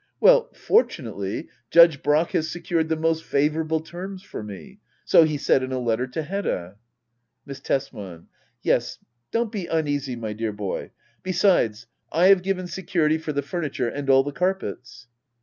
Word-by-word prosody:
Well, - - +5
fortunately. 450 +4 0 0.2
Judge 170 -4 +6
Brack 150 +3 +2
has 160 - 0
secured 170 -2 -1
the 160 - +2
most 160 0 0
favourable 155 +2 0
terms 185 +4 -8
for - - -7
me, 105 - -10
— - - -40
so 165 - +6
he 155 -1 -1
said 135 - +2
in 130 0 -4
a 130 - -1
letter 120 0 0
to 130 +5 -4
Hedda. 145 - -3 0.7
Miss 140 -1 -8
Tesman. 100 -11 -4 0.4
Yes, - - +1 0.3
don't 230 -1 -1
be 195 -6 -4
uneasy, 145 -5 -1
my 110 -2 -5
dear 110 0 -3
boy. 100 -2 -4 0.2
— - - -38
Besides, 175 - +2 0.3
I 180 +3 +4
have 195 -2 +6
given 185 0 -2
security 170 -4 0
for 155 -1 -4
the 145 -1 -2
furniture 140 -5 -2
and 140 +2 -5
all 135 0 +6
the 145 - -4
carpets. 160 -8 -3
155 Hz, 165 wpm, -24 LUFS, 130-180 Hz, 0.7 s, Judge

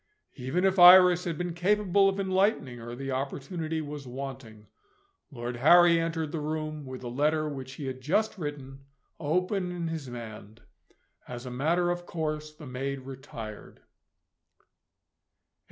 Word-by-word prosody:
Even 135 +9 -1
if 190 0 +2
Iris 180 0 +9
had 170 -3 -2
been 175 0 -3
capable 195 +2 +3
of 195 0 -3
enlightening 190 - +1
her, 120 +1 -7
the 135 +1 -5
opportunity 155 +5 -3
was 145 -2 -7
wanting. 125 -4 -8 0.6
Lord 120 -3 -5
Harry 170 +5 +6
entered 165 -2 -2
the 160 - -3
room, 155 -1 -4
with 130 -1 -7
the 125 - -6
letter 150 +5 +1
which 135 -3 -6
he 140 0 -7
had 130 -1 -5
just 205 +11 +1
written, 140 -3 -6 0.4
open 180 +4 0
in 170 -2 -3
his 160 -4 -5
hand, 110 -2 -9 0.6
As 120 0 -7
a 125 - -6
matter 170 +7 +1
of 175 0 -5
course, 155 -2 -3
the 155 0 -13
maid 135 +1 -4
retired. 130 -5 -9
150 Hz, 145 wpm, -28 LUFS, 130-175 Hz, 0.6 s, Iris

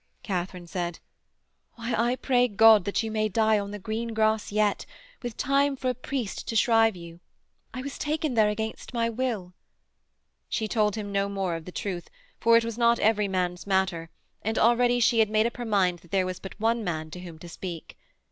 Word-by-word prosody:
Katharine 180 -2 -3
said: 175 0 -4 0.8
'Why, 235 +1 -4
I 240 +3 +1
pray 250 -1 +2
God 220 -2 +6
that 200 +3 0
you 220 - -3
may 215 0 0
die 220 +1 +3
on 200 0 -4
the 210 - -6
green 225 +3 -4
grass 220 -1 +1
yet, 210 -1 +1 0.3
with 240 -3 -6
time 275 +1 +2
for 255 -1 -1
a - - -4
priest 250 -3 -4
to 225 - -3
shrive 225 -2 +4
you. 170 -1 -11 0.5
I 255 - -6
was 280 0 -6
taken 305 -1 -1
there 215 -3 +4
against 220 +3 -5
my 230 0 +1
will.' 225 -7 -3 1.0
She 220 - -1
told 210 -1 +1
him 205 -2 -5
no 200 0 0
more 195 -4 -2
of 165 -1 -7
the 180 - -8
truth, 180 -3 -4 0.3
for 230 0 +5
it 230 - +1
was 230 0 -5
not 235 0 +4
every 210 -2 +2
man's 180 -1 -2
matter, 190 -4 0 0.3
and 220 +1 -2
already 240 +1 +4
she 230 -1 +3
had 220 -2 +4
made 215 +1 +3
up 235 - -2
her 240 - -4
mind 190 -5 +2
that 170 - -20
there 190 +1 +1
was 185 -1 -4
but 190 - -10
one 230 +1 +1
man 155 -4 -3
to 180 - -7
whom 175 -3 -9
to 175 - -11
speak.... 170 -1 -7
215 Hz, 205 wpm, -27 LUFS, 185-230 Hz, 1.0 s, God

